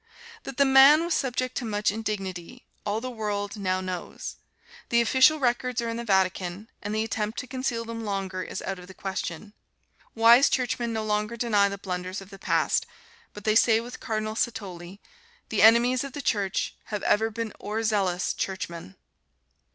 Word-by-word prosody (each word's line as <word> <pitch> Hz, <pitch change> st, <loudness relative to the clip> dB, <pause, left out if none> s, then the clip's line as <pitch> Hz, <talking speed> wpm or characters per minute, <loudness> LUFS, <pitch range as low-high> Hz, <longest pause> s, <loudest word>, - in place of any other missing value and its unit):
That 270 Hz, -, -7 dB
the 280 Hz, -, +5 dB
man 275 Hz, +4 st, +7 dB
was 340 Hz, -, 0 dB
subjected 255 Hz, -2 st, -1 dB
to 245 Hz, -, -5 dB
much 210 Hz, -2 st, 0 dB
indignity, 195 Hz, -5 st, -5 dB, 0.2 s
all 210 Hz, +2 st, -1 dB
the 255 Hz, +1 st, -4 dB
world 205 Hz, -3 st, -3 dB
now 185 Hz, -2 st, -1 dB
knows. 185 Hz, -2 st, -6 dB, 0.5 s
The 235 Hz, -, +4 dB
official 260 Hz, +6 st, +5 dB
records 250 Hz, -2 st, 0 dB
are 235 Hz, -1 st, -1 dB
in 230 Hz, -, -3 dB
the 235 Hz, -, -4 dB
Vatican, 190 Hz, -1 st, 0 dB
and 205 Hz, +1 st, -3 dB
the 220 Hz, -, +1 dB
attempt 220 Hz, 0 st, -3 dB
to -, -, -3 dB
conceal 250 Hz, -2 st, -3 dB
them 230 Hz, 0 st, -6 dB
longer 195 Hz, -3 st, -3 dB
is -, -, -6 dB
out 195 Hz, -1 st, -4 dB
of 180 Hz, -, -12 dB
the 190 Hz, -, -12 dB
question. 195 Hz, +1 st, -5 dB, 0.6 s
Wise 235 Hz, +4 st, +7 dB
Churchmen 245 Hz, -2 st, -1 dB
no 220 Hz, -1 st, -2 dB
longer 210 Hz, +2 st, -1 dB
deny 210 Hz, -4 st, +3 dB
the 200 Hz, -, -5 dB
blunders 185 Hz, 0 st, -4 dB
of 195 Hz, 0 st, -13 dB
the 195 Hz, -, -11 dB
past, -, -, +1 dB, 0.5 s
but 210 Hz, -, -9 dB
they 215 Hz, -1 st, +2 dB
say 225 Hz, 0 st, +5 dB
with 240 Hz, +2 st, -8 dB
Cardinal 215 Hz, -1 st, -2 dB
Satolli, 195 Hz, -5 st, -4 dB, 0.5 s
"The 220 Hz, -, +1 dB
enemies 235 Hz, +4 st, +6 dB
of 275 Hz, -2 st, -7 dB
the 290 Hz, -, -5 dB
Church 200 Hz, -4 st, 0 dB
have 210 Hz, -2 st, -4 dB
ever 220 Hz, +2 st, +2 dB
been 225 Hz, -1 st, -5 dB
o'er 215 Hz, +2 st, -2 dB
zealous 195 Hz, -5 st, +1 dB
Churchmen." 170 Hz, -, -5 dB
215 Hz, 180 wpm, -26 LUFS, 195-235 Hz, 0.6 s, man